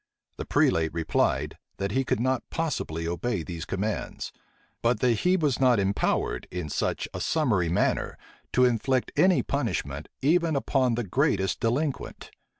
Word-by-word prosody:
The - - -5
prelate 80 -1 +2
replied, 80 -2 0 0.2
that 100 0 -2
he 135 +5 +1
could 130 - 0
not 130 +1 +1
possibly 105 - -2
obey 85 +3 -2
these 85 0 -6
commands; 105 +2 -3 0.5
But 120 +1 +2
that 125 - +4
he 180 +1 +3
was 150 -8 +1
not 125 -4 +4
empowered, 100 0 0
in 90 -4 -4
such - - -1
a - - -4
summary 110 - +1
manner, 85 - 0 0.4
to 125 - +5
inflict 125 +2 +1
any 185 -1 +4
punishment 90 - -2
even 165 +2 +3
upon 130 -3 +1
the 120 - -1
greatest 100 - +1
delinquent. 135 +5 -2
120 Hz, 150 wpm, -27 LUFS, 90-135 Hz, 0.5 s, to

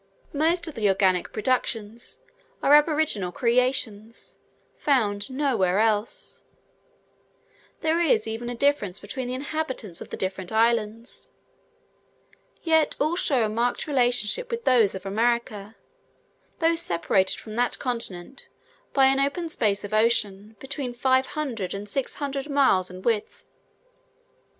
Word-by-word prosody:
Most 330 +4 +1
of 320 - -6
the 215 -5 +1
organic 190 -2 +2
productions 230 -1 -2 0.4
are 285 - +5
aboriginal 295 - +3
creations, 235 -2 -1 0.4
found 210 -6 +1
nowhere 250 -10 +1
else; 220 - 0 1.4
there 320 +1 +1
is 275 -10 +3
even 225 +2 -4
a 245 - -4
difference 230 -8 +1
between 255 +5 -5
the 250 - -3
inhabitants 260 - -4
of - - -9
the - - -6
different 190 -1 -4
islands; 225 +1 0 1.3
yet 320 -2 +3
all 310 +4 +1
show 265 -9 +2
a - - 0
marked 235 +3 -1
relationship 250 - +1
with 465 -1 -4
those 225 -6 +4
of 190 0 -8
America, 220 0 -1 0.8
though 330 0 +3
separated 190 - +1
from 215 -1 -9
that 245 0 +1
continent 235 -3 -4 0.4
by 270 -1 +5
an 270 +1 +4
open 285 +5 -1
space 210 -9 +1
of 205 +1 -7
ocean, 215 -2 +1
between 270 -1 -5
500 260 -5 0
and 200 +1 -6
600 275 +3 -3
miles 265 -10 +3
in 185 +1 -10
width. 225 -3 -1
235 Hz, 125 wpm, -25 LUFS, 205-280 Hz, 1.4 s, are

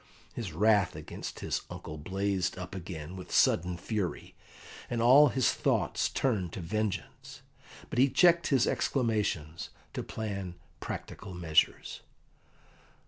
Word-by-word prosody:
His 110 -8 -5
wrath 100 +2 +3
against - - -7
his - - -1
uncle 75 - -7
blazed 95 +3 -1
up 90 -1 -7
again 90 -2 -7
with 90 -1 -9
sudden 90 +1 +3
fury, 100 0 -3 0.6
and 120 - -2
all 130 +6 +7
his 130 -2 +2
thoughts - - 0
turned 100 -10 -1
to - - -5
vengeance. 105 +3 -4 0.5
But - - -1
he 135 +2 +6
checked 170 +5 +4
his 135 -4 +3
exclamations 105 - -1 0.2
to - - -3
plan 100 -5 -5 0.2
practical 95 -3 -7
measures. 80 -3 +1
100 Hz, 125 wpm, -30 LUFS, 90-115 Hz, 0.6 s, all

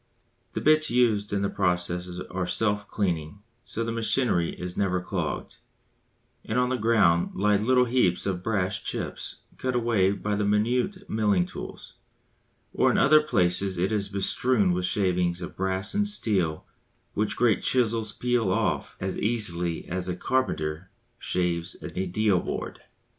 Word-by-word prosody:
The - - -3
bits 155 0 +4
used 115 -4 +2
in 100 -1 0
these 100 - -1
processes 90 -1 -1
are 90 -1 -2
self 105 -1 +1
cleaning, 90 -1 -2 0.2
so 115 - -3
the 115 - -2
machinery 115 -5 0
is 90 0 -5
never 90 -2 +1
clogged; 90 - -4 0.9
and 110 - -2
on 125 0 +2
the 130 - 0
ground 105 -8 +2
lie 105 +1 +3
little 125 +4 +3
heaps 115 -8 +1
of 95 -2 -2
brass 95 -1 -1
chips - - -5 0.2
cut 130 -1 -1
away 115 -6 +2
by 105 +1 -2
the 105 - 0
minute 125 - 0
milling 105 -5 +2
tools; - - -9 0.8
or - - +3
in - - +2
other 155 +2 +6
places 95 -8 +1
it 95 +5 0
is 100 -2 0
bestrewn 100 +1 +2
with 90 0 -1
shavings 90 -3 +1
of 85 - -7
brass 95 +1 -1
and 205 0 +1
steel 95 - 0 0.5
which 105 +1 -1
great 115 -3 +3
chisels 115 -3 +1
peel 120 0 0
off - - -1
as 95 0 -3
easily 90 -7 0
as 90 +1 -2
a 90 - -2
carpenter 90 -8 -1 0.3
shaves 85 -2 -1
a 95 +1 -3
deal 100 0 +2
board. - - -5
100 Hz, 155 wpm, -26 LUFS, 90-115 Hz, 0.9 s, other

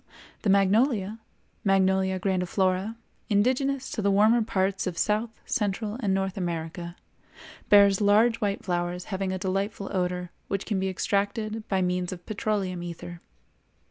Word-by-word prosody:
The 205 - 0
magnolia 205 +2 +3 0.4
(Magnolia 190 -1 +2
grandiflora), 185 +2 0 0.3
indigenous 260 +6 +1
to 215 - -2
the 200 - +2
warmer 215 +4 +4
parts 195 -2 0
of 175 -2 -4
South, 215 +2 +1 0.2
Central, 210 -1 -1
and 205 -6 0
North 190 0 -1
America, 170 -1 -4 0.7
bears 200 -1 +6
large 215 +3 +4
white 205 -3 -2
flowers 175 0 -2
having 190 0 -1
a 185 - -2
delightful 195 +2 -2
odor 180 -1 -1 0.2
which 195 0 -2
can 205 -4 -1
be 190 0 0
extracted 210 +3 -1
by 190 -2 +1
means 180 0 -1
of 175 -2 -8
petroleum 200 -4 -2
ether. 175 0 -7
195 Hz, 140 wpm, -27 LUFS, 185-210 Hz, 0.7 s, bears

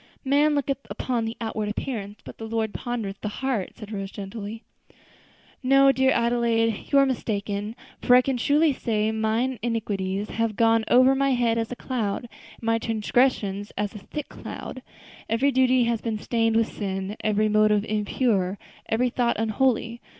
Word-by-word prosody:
"Man 290 +2 +3
looketh 275 -1 -1
upon 240 -3 -2
the 225 +1 -5
outward 220 -2 -3
appearance, 210 -2 -5
but - - -11
the 225 - -5
Lord 220 -1 -1
pondereth 225 -5 -4
the - - -3
heart," 230 -2 -2
said 215 -2 -9
Rose, 195 -2 -4
gently. 205 +3 -7 1.0
"No, 275 +1 +5
dear 265 0 +2
Adelaide, 235 -2 +1
you 280 - +5
are 275 - +6
mistaken; 210 -4 -2 0.3
for 245 - +5
I 250 - +6
can 270 0 0
truly 295 +5 +3
say 220 -3 0
'mine 220 +3 0
iniquities 205 -4 -2
have 225 -2 -1
gone 225 0 +3
over 255 +2 +6
my 275 0 +2
head 235 -2 +1
as 225 +1 -3
a - - -3
cloud, 230 -6 -2
and 240 - -16
my 225 0 +2
transgressions 215 -3 0
as 205 -1 -2
a 210 - -8
thick 300 +8 -6
cloud.' - - -8 0.5
Every 255 +5 +2
duty 255 -1 +4
has 230 -2 0
been 225 -2 -2
stained 225 +1 0
with 225 0 +1
sin, 195 0 -3
every 215 0 +2
motive 215 0 +3
impure, 210 -2 0 0.3
every 245 +2 +1
thought 240 -1 +1
unholy. 230 +1 0
225 Hz, 165 wpm, -25 LUFS, 210-250 Hz, 1.0 s, are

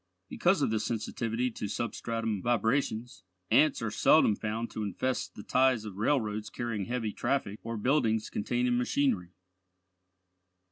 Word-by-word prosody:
Because 175 -3 +2
of - - +1
this 110 -1 0
sensitivity 115 +2 -2
to 105 - -5
substratum 115 -1 -2
vibrations, 120 +1 0 0.3
ants 150 -6 +4
are 110 - -1
seldom 110 -3 +5
found 110 +3 -3
to 110 - -5
infest 115 +5 -2
the 105 - -8
ties 130 -3 +2
of 100 -3 -8
railroads 110 -3 0
carrying 115 -5 -3
heavy 115 -3 -2
traffic, 110 -7 -1
or 115 0 -4
buildings 110 -2 +1
containing 120 +3 0
machinery. 120 -9 0
115 Hz, 135 wpm, -30 LUFS, 105-125 Hz, 0.3 s, seldom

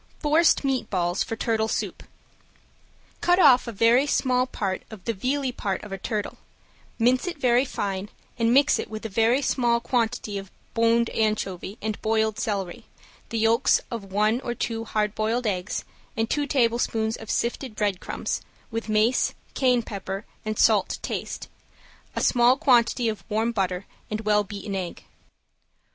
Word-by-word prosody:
~FORCED 315 +2 +3
MEAT 270 -2 0
BALLS 175 -1 0
FOR 225 - -4
TURTLE 220 -1 0
SOUP~ - - -3 1.2
Cut 355 0 +4
off 265 -9 +6
a - - -3
very 230 +6 +4
small 255 -2 +2
part 195 -6 -3
of 215 -5 -11
the 230 - 0
vealy 255 +5 -1
part 195 -3 -2
of 210 - -9
a 195 - -3
turtle, 210 +1 -3 0.6
mince 250 +6 +2
it 340 - -3
very 250 -1 +3
fine 200 -5 -3 0.3
and 230 0 +3
mix 280 +3 +4
it - - -4
with 215 0 -7
a - - -2
very 230 +6 +2
small 240 -3 +2
quantity 230 -4 -1
of 195 -1 -10 0.2
boned 230 0 +3
anchovy 215 -2 -1
and 215 -1 -3
boiled 220 -1 +1
celery, 200 +1 -3 0.4
the 230 - -2
yolks 225 +3 +4
of 205 -5 -6
one 215 +5 +2
or 240 -2 -3
two 225 0 -3
hard 210 -2 0
boiled 225 +3 -1
eggs, 190 -2 -2 0.3
and 225 0 0
two 290 -1 0
tablespoons 230 -3 +1
of 220 - -10
sifted 240 0 -2
breadcrumbs, 205 -4 -2 0.3
with 225 0 -4
mace, 215 +4 +2 0.2
cayenne 250 -3 +2
pepper 195 -1 -5 0.2
and 215 0 -3
salt - - +4
to - - -4
taste, - - -4 0.7
a - - -1
small 245 +1 +4
quantity 240 -3 +3
of 215 -2 -3
warm 220 +2 +1
butter, 190 -3 -1 0.2
and 215 0 -3
well 210 -1 +3
beaten 200 0 -6
egg. 185 -3 -4
225 Hz, 160 wpm, -25 LUFS, 210-245 Hz, 1.2 s, off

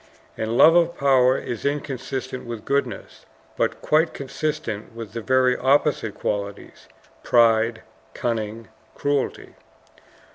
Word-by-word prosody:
And 110 +2 -2
love 165 - +8
of 170 0 +3
power 130 -2 +4
is 120 - -5
inconsistent 130 -3 -4
with 115 -2 -7
goodness; 140 -6 -3 0.3
but - - -1
quite 160 +2 +2
consistent 140 -6 -4
with 115 -3 -8
the 115 - -4
very 130 +1 +3
opposite 135 -4 +1
qualities 100 -1 -5 0.3
pride, 115 -1 +3 0.3
cunning, 115 -1 -3 0.3
cruelty. 145 -1 -2
125 Hz, 110 wpm, -23 LUFS, 115-140 Hz, 0.3 s, love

